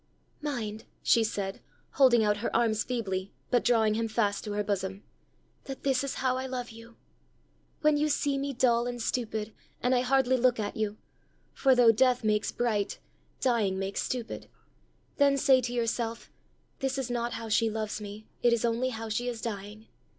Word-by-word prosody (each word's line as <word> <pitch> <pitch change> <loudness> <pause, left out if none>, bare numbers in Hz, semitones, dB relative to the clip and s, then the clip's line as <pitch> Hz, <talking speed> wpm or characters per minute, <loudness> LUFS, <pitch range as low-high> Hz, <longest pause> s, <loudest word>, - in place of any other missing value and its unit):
"Mind," 225 -7 -4 0.2
she 230 - +4
said, 200 -3 -3 0.3
holding 250 -5 +5
out 210 -1 +2
her 230 - -3
arms 220 -2 +2
feebly, 195 -6 -3 0.2
but 245 -2 +3
drawing 225 -3 +3
him 225 +1 0
fast 215 -2 0
to 210 - -4
her 210 0 0
bosom, 195 -1 -3 0.6
"that 270 -1 -7
this 270 -1 +2
is 275 - -3
how 255 -1 0
I 260 0 -3
love 250 -2 -4
you! 230 +1 -14 0.8
When 305 -1 +4
you 300 +1 +1
see 285 -1 +1
me 280 +1 -2
dull 240 -2 +2
and 245 0 -4
stupid, 220 -2 -2 0.3
and 250 +1 +1
I 250 - +3
hardly 260 0 +3
look 250 -1 +3
at 205 -1 -3
you 215 -1 -2 0.6
for 265 -2 +4
though 240 -2 +7
death 250 +2 +3
makes 210 -1 +1
bright, 215 -4 -1 0.4
dying 220 -7 +2
makes 195 +1 -2
stupid 245 -3 -4 0.7
then 280 -1 +4
say 265 -1 +5
to 240 0 -3
yourself, 230 -1 -2 0.5
'This 270 -1 -1
is 260 -2 -2
not 240 0 -1
how 230 - -5
she 225 +1 +2
loves 215 -1 -3
me; 210 +1 -8
it 240 -1 +4
is 235 0 +1
only 235 +2 +1
how 225 -2 -5
she 220 +3 -2
is 240 -2 -3
dying! 210 0 -6
235 Hz, 180 wpm, -29 LUFS, 215-255 Hz, 0.8 s, though